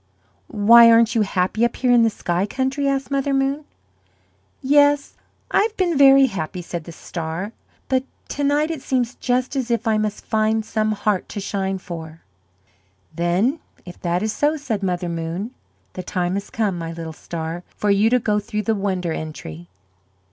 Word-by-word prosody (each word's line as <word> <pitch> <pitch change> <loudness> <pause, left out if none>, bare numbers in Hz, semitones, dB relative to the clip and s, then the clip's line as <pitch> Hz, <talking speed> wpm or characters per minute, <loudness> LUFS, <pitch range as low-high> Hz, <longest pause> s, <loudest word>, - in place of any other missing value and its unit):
"Why, 230 +3 +7
aren't 230 0 +5
you 230 - +2
happy 195 +2 0
up 235 - +1
here 250 -1 +1
in 240 -1 +6
the 225 - +4
sky 180 -2 -2
country?" 265 +4 -1
asked 275 -1 -1
Mother 275 0 0
Moon. 275 +2 0 1.0
"Yes, 285 +1 +3 0.4
I - - +4
have 430 +1 -1
been 355 -3 +1
very 275 -1 +7
happy," 180 -5 -4
said 170 -2 -6
the 170 - -8
star; 165 +4 -5 0.4
"but 260 -1 +1 0.3
to 285 - -3
night 295 +3 +2
it 315 -5 -5
seems 250 -2 -1
just 250 +2 -1
as 260 -3 -2
if 235 0 0
I 215 -1 +2
must 210 -1 -3
find 220 0 +1
some 215 -1 0
heart 205 -2 -1
to - - -5
shine 195 -1 -2
for." 165 -4 -8 0.9
"Then 185 - +1 0.3
if 175 -1 -11
that 175 +2 0
is 215 -1 -1
so," 300 +2 +1
said 235 -8 -3
Mother 180 -2 -1
Moon, 170 +6 -4 0.4
"the 185 - -5
time 180 0 -2
has 200 +1 -4
come, 205 -6 -1
my 165 0 -5
little 165 -1 -7
star, 165 +1 -5 0.2
for 210 - +1
you 205 +3 +4
to 250 - +4
go 210 -3 0
through 210 +1 -4
the 225 - +1
Wonder 190 -5 -1
Entry." 85 - -7
215 Hz, 180 wpm, -21 LUFS, 180-260 Hz, 1.0 s, Why